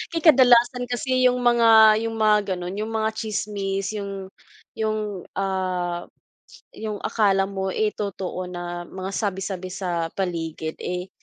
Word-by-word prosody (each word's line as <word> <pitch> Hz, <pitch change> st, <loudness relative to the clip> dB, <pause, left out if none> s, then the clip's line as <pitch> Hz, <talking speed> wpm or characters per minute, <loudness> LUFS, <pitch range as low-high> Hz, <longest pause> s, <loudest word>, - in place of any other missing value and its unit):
Kay 330 Hz, -, -1 dB
kadalasan 245 Hz, -4 st, +5 dB
kasi 255 Hz, +1 st, +2 dB
'yung 250 Hz, -, +2 dB
mga 225 Hz, -3 st, +6 dB
'yung 225 Hz, 0 st, -3 dB
mga 210 Hz, -3 st, +2 dB
gano'n, 180 Hz, 0 st, -5 dB
'yung 215 Hz, -, -2 dB
mga 220 Hz, -1 st, -1 dB
tsismis, 200 Hz, -3 st, -3 dB
'yung 195 Hz, -1 st, -6 dB, 0.5 s
'yung, 215 Hz, -3 st, -2 dB
ah, 185 Hz, -3 st, -2 dB, 0.7 s
'yung 215 Hz, -2 st, -5 dB
akala 195 Hz, -3 st, +2 dB
mo, 190 Hz, -1 st, -3 dB
eh, 215 Hz, +2 st, 0 dB
totoo 185 Hz, -3 st, -4 dB
na 175 Hz, -1 st, -6 dB
mga 190 Hz, +1 st, -6 dB
sabi-sabi 190 Hz, -2 st, -3 dB
sa 175 Hz, -3 st, -2 dB
paligid, 165 Hz, -4 st, -3 dB
eh. 180 Hz, +1 st, -4 dB
200 Hz, 135 wpm, -24 LUFS, 185-220 Hz, 0.7 s, mga